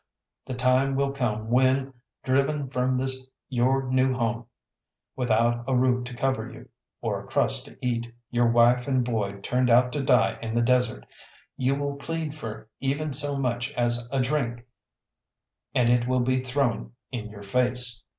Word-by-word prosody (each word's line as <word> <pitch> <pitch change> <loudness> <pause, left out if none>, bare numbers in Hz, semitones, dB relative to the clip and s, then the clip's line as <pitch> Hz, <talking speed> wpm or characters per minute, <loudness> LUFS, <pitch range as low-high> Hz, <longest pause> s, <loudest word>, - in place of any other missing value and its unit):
The 130 - -4
time 130 +2 +2
will 140 0 +1
come 110 -5 -2
when, 130 +2 +3 0.3
driven 135 +1 +1
from 130 0 +1
this 130 0 0 0.2
your 130 +1 +2
new 130 0 +2
home, 115 -1 -2 0.7
without 120 -1 +1
a 135 - +1
roof 125 0 +2
to 125 0 -7
cover 135 +2 -1
you, - - -13 0.3
or - - -1
a - - -14
crust - - +1
to - - -15
eat, 120 -1 -1 0.2
your 120 -1 +3
wife 120 +2 +4
and 130 -3 +1
boy 100 -4 -2
turned 125 +4 +1
out 125 +1 +5
to 145 - -2
die 135 - +3
in 115 0 -4
the 120 - +3
desert, 125 -1 +1 0.5
you 130 +1 +1
will 140 0 -3
plead 160 +1 -4
for 115 -8 -7
even 140 +2 -1
so 145 +1 0
much 125 0 -1
as 120 -2 0
a 135 - 0
drink, 125 -3 -1 1.1
and 125 -3 +4
it 120 0 +2
will 130 0 +2
be 130 +1 +1
thrown 130 -3 -1 0.2
in 110 -4 -5
your 105 -1 -11
face. 125 +1 0
125 Hz, 170 wpm, -26 LUFS, 120-135 Hz, 1.1 s, out